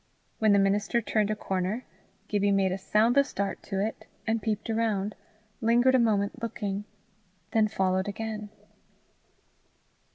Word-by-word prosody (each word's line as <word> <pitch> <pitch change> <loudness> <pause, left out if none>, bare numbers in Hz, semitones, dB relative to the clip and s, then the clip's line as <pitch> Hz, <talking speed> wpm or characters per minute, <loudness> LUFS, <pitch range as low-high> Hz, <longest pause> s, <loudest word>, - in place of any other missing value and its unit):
When 220 -1 +4
the 200 - +6
minister 200 +4 +2
turned 215 -2 0
a 215 - 0
corner, 195 +4 -2 0.4
Gibbie 205 -1 +1
made 195 -1 +2
a 185 - -1
soundless 230 +8 +3
dart 200 -1 -2
to 195 -2 -3
it, 220 - -6 0.2
and 225 0 0
peeped 210 0 -2
round, 220 -3 0 0.5
lingered 240 +3 +4
a 260 - +5
moment 215 0 +1
looking, 205 -3 -3 0.7
then 220 -1 +3
followed 190 -2 0
again. 215 0 -4
210 Hz, 135 wpm, -28 LUFS, 195-225 Hz, 0.7 s, the